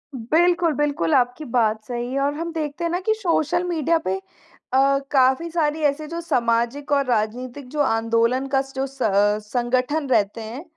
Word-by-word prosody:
बिल्कुल, 335 +7 +2
बिल्कुल 295 +1 0
आपकी 250 +4 +1
बात 220 -3 +1
सही 245 0 -4
है 275 - 0
और 285 +1 +1
हम 335 +2 -4
देखते 310 +1 -4
हैं 335 - 0
ना 355 - 0
कि 435 +3 +1
सोशल 345 -4 0
मीडिया 335 -2 +1
पे 190 - +1 0.6
अ, 275 +1 +4
काफ़ी 265 +5 +3
सारी 315 -2 0
ऐसे 295 +1 0
जो 335 +1 -5
सामाजिक 240 0 0
और 280 -1 +3
राजनीतिक 250 +3 -2
जो 300 +1 -5
आंदोलन 230 +1 +1
का 270 - +4
जो 265 +1 -1
स 270 - -18 0.5
संगठन 255 +5 0
रहते 210 -1 +1
हैं 235 +8 -7
275 Hz, 175 wpm, -22 LUFS, 240-315 Hz, 0.6 s, अ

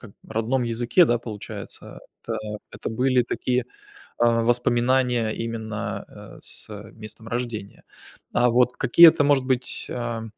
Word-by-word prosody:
как 115 - -12 0.2
родном 120 +4 -1
языке, 120 +8 +3
да, 120 -5 +1
получается, 110 -3 -9 0.2
это - - -4 0.3
это - - -6
были 125 +2 +2
такие, 125 +1 -1 0.5
а, 115 -1 +3
воспоминания 120 0 +2
именно, 115 -1 -4
э, - - -13
с, - - -6
э, 105 0 -9
местом 110 0 -9
рождения. 115 -4 -5 0.5
А 120 0 +3
вот 125 +1 +3
какие-то, 155 +4 +7
может 140 -2 +3
быть, 130 -1 -2
а, 120 -2 -4
120 Hz, 135 wpm, -24 LUFS, 115-125 Hz, 0.5 s, какие-то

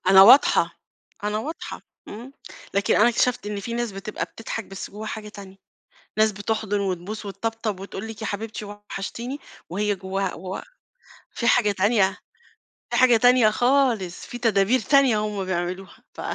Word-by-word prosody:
أنا 190 0 +9
واضحة 245 +8 +6 0.4
أنا 210 +1 0
واضحة، 310 +9 -6 0.3
إمم، 240 +6 -9 0.4
لكن 200 -1 +2
أنا 225 +3 +6
اكتشفت 240 -2 +1
إن 205 -1 -3
في 230 - -5
ناس 240 -3 -2
بتبقى 195 +2 -4
بتضحك 225 -1 -6
بس 195 0 -8
جواها 215 +2 -7
حاجة 215 -1 -6
تانية، 195 -2 -11 0.6
ناس 215 0 +4
بتحضُن 205 0 -2
وتبوس 195 +3 -4
وتطبطب، 215 0 -3
وتقول 195 +2 -7
لِك 220 0 -8
"يا 220 - -2
حبيبتي 215 +1 -5
وحشتيني." 205 +5 -6 0.3
وهي 205 +2 0
جواها 190 0 -3
و 185 +2 -6 0.8
في 235 - -1
حاجة 235 -3 +4
تانية 200 0 +2 0.7
في - - +1
حاجة 250 -3 +6
تانية 245 -2 +5
خالص، 240 -7 +1
في 245 - -7
تدابير 225 +1 +3
تانية، 275 -6 +4
هم 210 -2 -2
بيعملوها 185 +1 -4 0.2
ف - - -8
210 Hz, 155 wpm, -24 LUFS, 195-230 Hz, 0.8 s, أنا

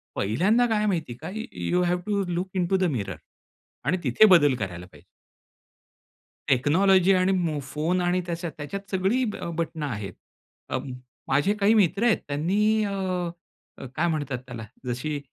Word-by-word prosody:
पहिल्यांदा 190 - +2
काय 215 -2 +1
माहिती 165 -10 -1
आहे - - -14
का? - - -4
य 230 - -6 0.2
you 180 +1 +2
have 175 0 +1
to 200 -1 +1
look 175 +2 -2
into 185 +1 +1
the 185 - 0
mirror 100 - -4 0.7
आणि 185 - +2
तिथे 130 - +5
बदल 145 -5 +4
करायला 90 -5 -5
पाहिजे. 90 - -18 1.4
टेक्नॉलॉजी 185 +8 +4
आणि 185 +1 +3
मो 165 -5 0
फोन 165 +5 0
आणि 180 +1 +1
त्याच्या 170 -1 -3
त्याच्यात 195 +7 -6
सगळी 195 +7 +1 0.2
अ, - - -4
बटणं 160 -2 -3
आहेत. 105 -7 -5 0.6
अं, 130 +1 -3 0.4
माझे 145 +9 +2
काही 205 +3 +4
मित्र 200 0 +3
आहेत 235 - +4
त्यांनी 205 +9 +1
अ, 200 - -2 0.9
अ, - - -8
काय 170 +2 +1
म्हणतात 145 -5 -2
त्याला? 120 -3 -7 0.2
जशी 145 +5 -2
175 Hz, 160 wpm, -25 LUFS, 145-195 Hz, 1.4 s, तिथे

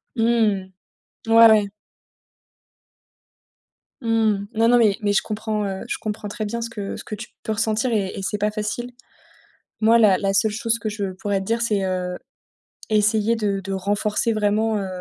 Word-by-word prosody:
Mmh. 225 -5 +1 0.6
Ouais, 230 0 +8
ouais. 210 -2 +3 2.3
Mmh. 220 -3 +1
Non, 225 +1 +3
non, 245 +1 +5
mais 215 -4 +3
mais 205 -1 +1
je - - +3
comprends, 215 0 -3
heu, 190 -1 -4
je - - -2
comprends 210 -1 -5
très 215 +1 -4
bien 235 +3 -4
ce 230 - -4
que 205 -3 -6
ce - - -9
que 215 - -6
tu 225 +4 -9
peux 220 - -2
ressentir 220 +3 0
et 200 -3 0
et - - -4
c'est 205 +2 -2
pas 210 +1 0
facile. 215 +3 -4 0.9
Moi, 225 +1 +5
la 200 -5 +5
la 195 -1 -1
seule 215 +2 +3
chose 230 +2 0
que 220 - -3
je 205 -3 -3
pourrais 195 +1 -2
te - - -6
dire, 230 +2 0
c'est, 210 -4 0
heu, 180 -1 -2 0.7
essayer 215 +1 +2
de 205 -3 -1
de 195 0 -5
renforcer 205 +3 0
vraiment, 215 +1 +1
heu, 195 - -3
215 Hz, 180 wpm, -22 LUFS, 200-225 Hz, 2.3 s, Ouais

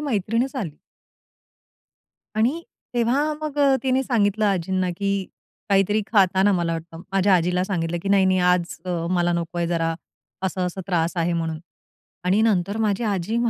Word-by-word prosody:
मैत्रीणच 235 -1 -1
आली. 165 - -5 1.6
आणि 255 +10 +1 0.3
तेव्हा 255 +6 +1
मग 300 -1 -4
अ, 275 -2 +5
तिने 265 0 +2
सांगितलं 215 -4 +1
आजींना, 185 -1 0
की 200 -1 -1 0.4
काहीतरी 200 +2 +3
खाताना 195 0 +4
मला 170 -2 0
वाटतं, 165 0 -6
माझ्या 195 0 +4
आजीला 180 +1 +2
सांगितलं, 175 -3 -2
की 195 - -3
"नाही, 195 -1 +4
नाही, 185 0 +3
आज 180 -1 +2
अ, 180 - -4 0.2
मला 175 -1 +2
नको 170 0 -3
आहे, 170 - 0
जरा 165 -1 0 0.5
असं-असं 185 0 -2
त्रास 170 -2 0
आहे." 170 0 +1
म्हणून. 165 -2 -2 0.7
आणि 190 +4 +3
नंतर 200 -2 +1
माझी 205 +2 0
आजी 205 +1 -1
190 Hz, 150 wpm, -23 LUFS, 175-215 Hz, 1.6 s, अ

